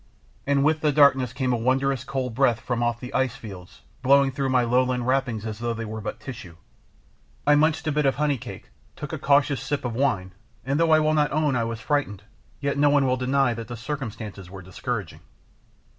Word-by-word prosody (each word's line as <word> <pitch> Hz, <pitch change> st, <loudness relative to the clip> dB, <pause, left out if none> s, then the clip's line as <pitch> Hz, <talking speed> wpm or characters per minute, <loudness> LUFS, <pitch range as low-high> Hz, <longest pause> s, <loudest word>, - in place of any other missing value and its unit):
And 140 Hz, -1 st, +2 dB
with 155 Hz, +1 st, +2 dB
the 150 Hz, -, +2 dB
darkness 135 Hz, -4 st, +4 dB
came 130 Hz, -1 st, -1 dB
a -, -, +1 dB
wondrous 130 Hz, +2 st, 0 dB
cold 130 Hz, -2 st, -3 dB
breath 120 Hz, -2 st, +2 dB
from 120 Hz, 0 st, -3 dB
off 120 Hz, -1 st, 0 dB
the 125 Hz, 0 st, -8 dB
ice 130 Hz, -2 st, 0 dB
fields, 95 Hz, -7 st, -11 dB, 0.2 s
blowing 135 Hz, +1 st, +4 dB
through 135 Hz, 0 st, -2 dB
my 130 Hz, -1 st, +3 dB
lowland 125 Hz, 0 st, +1 dB
wrappings 125 Hz, -4 st, 0 dB
as 110 Hz, -1 st, -5 dB
though 120 Hz, 0 st, -2 dB
they 115 Hz, 0 st, -5 dB
were 110 Hz, 0 st, -6 dB
but 105 Hz, -, -5 dB
tissue. 110 Hz, -10 st, -9 dB, 0.9 s
I 150 Hz, -, +5 dB
munched 155 Hz, +2 st, +2 dB
a 155 Hz, -, 0 dB
bit 150 Hz, -1 st, +1 dB
of 135 Hz, -, +2 dB
honey 145 Hz, -3 st, 0 dB
cake, -, -, -10 dB, 0.2 s
took -, -, -7 dB
a -, -, -3 dB
cautious 140 Hz, -2 st, +2 dB
sip 135 Hz, 0 st, -3 dB
of 120 Hz, -, -2 dB
wine, 105 Hz, -8 st, 0 dB, 0.3 s
and 140 Hz, +3 st, 0 dB
though 165 Hz, 0 st, +3 dB
I 155 Hz, 0 st, +6 dB
will 155 Hz, 0 st, +2 dB
not 150 Hz, -2 st, +2 dB
own 150 Hz, -2 st, +1 dB
I 115 Hz, -2 st, 0 dB
was 115 Hz, -1 st, -5 dB
frightened, 125 Hz, -10 st, -1 dB, 0.4 s
yet 140 Hz, 0 st, -1 dB
no 145 Hz, 0 st, +5 dB
one 145 Hz, -1 st, +3 dB
will 130 Hz, -1 st, +2 dB
deny 130 Hz, 0 st, +1 dB
that 115 Hz, -1 st, -7 dB
the 120 Hz, 0 st, -7 dB
circumstances 110 Hz, -7 st, -6 dB
were 95 Hz, 0 st, -10 dB
discouraging. 95 Hz, 0 st, -5 dB
130 Hz, 215 wpm, -24 LUFS, 115-140 Hz, 0.9 s, I